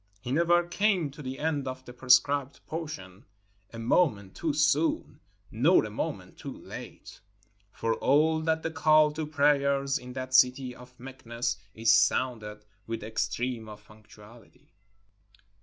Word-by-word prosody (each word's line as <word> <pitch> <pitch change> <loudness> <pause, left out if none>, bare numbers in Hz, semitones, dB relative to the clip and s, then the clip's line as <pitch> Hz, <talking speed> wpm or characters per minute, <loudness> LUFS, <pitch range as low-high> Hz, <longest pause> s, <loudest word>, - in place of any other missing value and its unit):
He 125 +4 -6
never 170 +3 +3
came 180 -4 +1
to 150 +2 -11
the 130 -1 -6
end 150 -3 -2
of 130 0 -6
the 125 - -10
prescribed 135 +2 +2
portion 110 - -7 0.5
a 115 - -9
moment 115 - +1
too 165 - -2
soon, 150 +2 +1 0.3
nor - - +4
a - - -7
moment - - -5
too - - -7
late; - - -10 0.5
for 115 +2 -1
all 155 +6 +2
that 160 0 0
the 165 - -2
call 155 -1 +4
to 155 0 -4
prayers 140 -2 +2
in 125 0 -10
that 130 0 -6
city 125 0 +3
of 125 0 -15
Meknes 120 -4 -4 0.2
is 115 +1 +4
sounded 110 -3 0 0.2
with 115 0 -4
the - - -7
extreme 110 +1 -3
of 105 0 -12
punctuality. 110 +1 -18
130 Hz, 145 wpm, -28 LUFS, 115-150 Hz, 0.5 s, nor